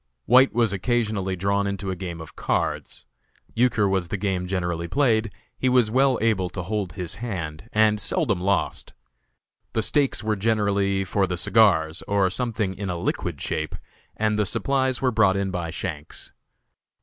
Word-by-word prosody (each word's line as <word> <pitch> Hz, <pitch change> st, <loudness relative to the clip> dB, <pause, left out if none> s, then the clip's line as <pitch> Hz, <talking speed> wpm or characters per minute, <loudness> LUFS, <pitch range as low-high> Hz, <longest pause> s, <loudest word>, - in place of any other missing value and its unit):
White 130 Hz, +3 st, +6 dB
was 115 Hz, -3 st, +2 dB
occasionally 105 Hz, -3 st, 0 dB
drawn 100 Hz, +2 st, 0 dB
into 100 Hz, -1 st, -3 dB
a -, -, -3 dB
game 85 Hz, -2 st, -6 dB
of 80 Hz, -, -11 dB
cards. -, -, -2 dB, 0.5 s
Euchre 115 Hz, -3 st, +2 dB
was 95 Hz, -2 st, 0 dB
the 105 Hz, -, -3 dB
game 95 Hz, -2 st, -1 dB
generally 90 Hz, -2 st, -2 dB
played; 115 Hz, -, +2 dB, 0.2 s
he 130 Hz, -, 0 dB
was 125 Hz, -4 st, +3 dB
well 130 Hz, +1 st, +3 dB
able 100 Hz, -6 st, +1 dB
to 90 Hz, 0 st, -5 dB
hold 100 Hz, -2 st, -3 dB
his 90 Hz, 0 st, -5 dB
hand, 90 Hz, -4 st, -5 dB
and 105 Hz, -1 st, +3 dB
seldom 100 Hz, -6 st, 0 dB
lost. 100 Hz, 0 st, -1 dB, 0.8 s
The 110 Hz, -, +1 dB
stakes 140 Hz, -3 st, +1 dB
were 110 Hz, 0 st, 0 dB
generally 100 Hz, -2 st, +1 dB
for 95 Hz, +1 st, 0 dB
the 90 Hz, 0 st, -3 dB
cigars, 85 Hz, -6 st, +3 dB
or 100 Hz, -2 st, +2 dB
something 110 Hz, -4 st, -2 dB
in 95 Hz, 0 st, -5 dB
a 90 Hz, -, -2 dB
liquid -, -, -2 dB
shape, 80 Hz, 0 st, -3 dB, 0.4 s
and 105 Hz, -1 st, +1 dB
the 105 Hz, -, +2 dB
supplies 130 Hz, +4 st, 0 dB
were 130 Hz, -, +3 dB
brought 105 Hz, -4 st, +3 dB
in 100 Hz, -1 st, -1 dB
by 85 Hz, -3 st, -3 dB
Shanks. 80 Hz, -3 st, -6 dB
100 Hz, 165 wpm, -24 LUFS, 90-110 Hz, 0.8 s, White